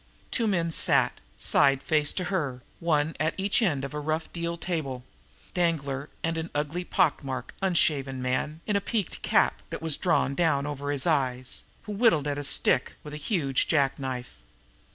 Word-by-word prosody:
Two 230 -3 +1
men 170 -5 +1
sat, - - +3 0.2
side 140 -1 +3
face 150 -2 +2
to 185 - -1
her, 135 -9 -2 0.2
one 160 -2 +1
at 155 +2 +1
each 200 +4 +2
end 145 -11 +1
of 140 - -7
a 150 - -3
rough, 155 +2 -2
deal 170 0 -3
table 150 -8 -3 0.5
Danglar, 150 -5 0
and 165 0 0
an 160 +1 -4
ugly, 150 +4 -1
pock 170 -4 +2
marked, 130 -1 -5
unshaven 145 -8 +1
man, 130 +5 -1
in 210 - 0
a 200 - +2
peaked 205 -3 -2
cap - - +2
that - - -4
was 160 -3 +2
drawn 165 -6 +2
down 145 -3 +2
over 145 -1 -4
his 140 -2 -1
eyes, 130 -6 0 0.2
who 210 - -7
whittled 205 - +3
at 145 0 -1
a - - -4
stick 135 -2 +2
with 150 - -8
a - - -4
huge 145 - 0
jack 140 -4 +2
knife. 125 - -5
150 Hz, 180 wpm, -27 LUFS, 140-170 Hz, 0.5 s, sat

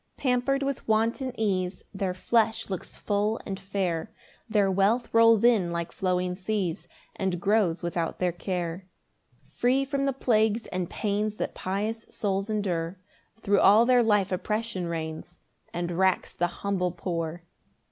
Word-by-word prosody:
3 - - -16
[Pamper'd 270 +2 +2
with 275 -1 -3
wanton 230 +4 +1
ease, 185 -4 -1
Their 190 -2 -2
flesh 220 +2 +1
looks 190 - -5
full 210 +2 0
and 195 -2 -4
fair, 190 -4 -2 0.4
Their 205 -3 +3
wealth 210 +6 +1
rolls 230 -1 +6
in 215 -8 +4
like 170 0 -3
flowing 180 -1 -1
seas, 185 -4 -2 0.3
And 190 -3 -1
grows 195 -3 +2
without 170 -1 -2
their 180 -1 +1
care. 175 0 -4 0.6
4 - - -29
Free 260 +3 +3
from 275 0 -1
the 275 - +1
plagues 220 -3 +2
and 180 -2 -3
pains 210 0 -1
That - - -3
pious 210 +4 -3
souls 195 -1 -2
endure, 185 -4 -1 0.4
Thro' 200 -2 +3
all 210 +4 +7
their 250 0 +5
life 210 -4 +2
oppression 210 0 -2
reigns 160 +1 -5 0.3
And 175 0 -3
racks 185 +2 +1
the 175 - 0
humble 180 0 -2
poor. 170 -1 -4
195 Hz, 150 wpm, -27 LUFS, 180-225 Hz, 0.6 s, all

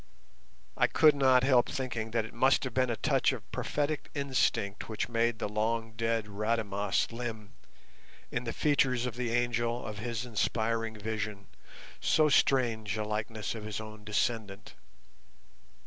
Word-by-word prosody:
I - - +3
could 155 -2 +5
not 130 -2 +4
help 130 -2 +4
thinking 120 -4 -3
that 115 -1 0
it - - -11
must 130 +4 +3
have 130 -3 -4
been 130 0 +2
a 115 - 0
touch - - +2
of - - -8
prophetic 150 +1 -2
instinct 130 -8 0
which 110 - -2
made 115 0 +1
the - - -2
long 110 +2 -1
dead 115 0 -1
Rademas 105 -1 -1
limn, 115 -3 -6 0.8
in 120 +1 -2
the 115 - -2
features 130 -4 +2
of 125 -3 -4
the 125 -1 -2
angel 120 0 0
of 105 -1 -6
his 120 +1 -3
inspiring 115 0 -1
vision, 105 -1 -4 0.5
so 155 -1 +3
strange 115 -7 +2
a 105 - -1
likeness 105 0 -3
of 110 -2 -7
his 105 -1 -4
own 110 -1 -9
descendant. 105 -1 -2
115 Hz, 150 wpm, -30 LUFS, 110-125 Hz, 0.8 s, could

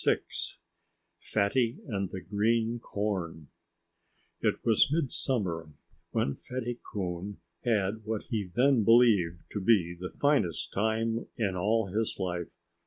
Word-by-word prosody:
VI - - +4 1.0
FATTY 115 +3 +1
AND 100 -4 -2
THE 95 - -6
GREEN 115 +4 +1
CORN 95 -9 -3 0.9
It - - +2
was 115 +4 +4
mid 155 -4 +1
summer 90 - -1 0.4
when 70 - 0
Fatty 120 -1 -4
Coon 95 0 -4 0.2
had 110 -2 +1
what 110 0 -2
he 105 -5 -1
then 130 -1 +4
believed 100 -7 +5
to 105 - -3
be 95 -5 +3
the 90 +1 -6
finest 140 - +1
time 110 +2 0
in 100 -5 0
all 100 +1 +1
his 110 +1 0
life. 90 -3 -2
105 Hz, 125 wpm, -30 LUFS, 95-115 Hz, 1.0 s, believed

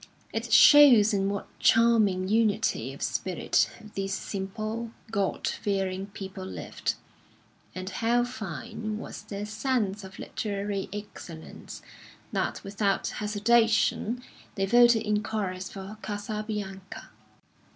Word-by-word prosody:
It 225 +1 -3
shows 235 -3 +8
in 195 -1 +1
what 200 -1 -3
charming 220 -5 +4
unity 220 0 +1
of - - -7
spirit - - 0 0.2
these 195 0 -2
simple, 215 +5 -4 0.2
God 200 -3 -1
fearing 195 -1 -2
people 190 -1 -8
lived, 190 - -4 0.8
and 185 0 -5
how 235 +4 +1
fine 215 -2 -5
was - - -7
their 200 0 -6
sense 215 -3 -1
of 190 0 -10
literary 200 -2 -3
excellence, 195 -6 -9 0.5
that - - -2
without 200 0 0
hesitation 225 +2 +2 0.3
they 195 -2 +1
voted 240 +1 +5
in 210 -1 +1
chorus 190 -3 -3
for 195 +2 -8
"Casabianca." 205 -2 -5
210 Hz, 110 wpm, -28 LUFS, 195-225 Hz, 0.8 s, shows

